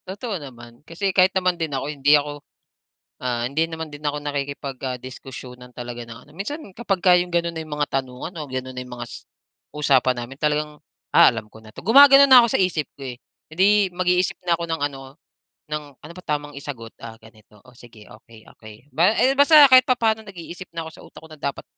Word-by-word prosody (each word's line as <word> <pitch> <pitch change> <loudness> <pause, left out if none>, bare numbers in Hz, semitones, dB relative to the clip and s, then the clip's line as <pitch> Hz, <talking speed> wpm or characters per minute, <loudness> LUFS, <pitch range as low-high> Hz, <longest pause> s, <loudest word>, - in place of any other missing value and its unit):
Totoo 200 -1 -5
naman 120 -3 -13
kasi 185 +5 -3
kahit 185 0 +5
naman 180 -2 0
din 160 - -1
ako - - -4
hindi 145 +1 +4
ako, 145 0 -5 0.8
ah, 120 -2 -1
hindi 145 +6 0
naman 160 -1 -6
din 145 - -10
ako 145 0 -1
nakikipag 140 -1 -4
ah, 130 -1 -3
diskusyunan 125 -1 -10
talaga 120 0 -7
ng 115 - -9
ano, - - -19
minsan 290 +11 -5
kapagka 190 -5 +2
yung 180 - -5
gano'n 170 0 0
na 160 - -4
yung 150 -1 -6
mga 145 0 -1
tanungan 130 +6 -9
o - - -6
gano'n 130 0 -5
na - - -3
yung 125 - -10
mgas 120 -1 -9 0.5
usapan 135 -4 +2
namin 135 +3 -13
talagang, 150 0 -1 0.4
"Ah, - - +8
alam 115 -2 -6
ko 110 - -15
na 110 - -15
'to," - - -12
gumagano'n 275 +4 +8
na 255 -2 +10
ako 235 - +1
sa - - -3
isip 170 -5 0
ko, 135 - -9
eh. - - -15 0.3
Eh, - - -11
di 190 +2 +5 0.3
mag-iisip 180 0 0
na 170 -1 +2
ako 170 - -4
ng 165 -2 -3
ano 135 0 -12 0.5
ng, 150 0 -3 0.2
"Ano 170 - -11
ba 180 - -11
tamang 145 -1 -3
isagot, 130 -6 -8
ah, 115 -1 -9
ganito 110 -2 -20
o 125 - -19
sige 115 -4 -16
okey, 110 0 -17
okey." 110 +5 -15
Ba 175 +9 +3
eh, 260 +2 +4
basta 290 +1 +8
kahit 255 0 +8
papaano 220 -3 +1
nag-iisip 180 -1 -10
na 165 - -4
ako - - -7
sa - - -15
utak - - -15
ko 160 - -14
na 155 - -11
dapat 140 - -4
150 Hz, 220 wpm, -22 LUFS, 130-180 Hz, 0.8 s, na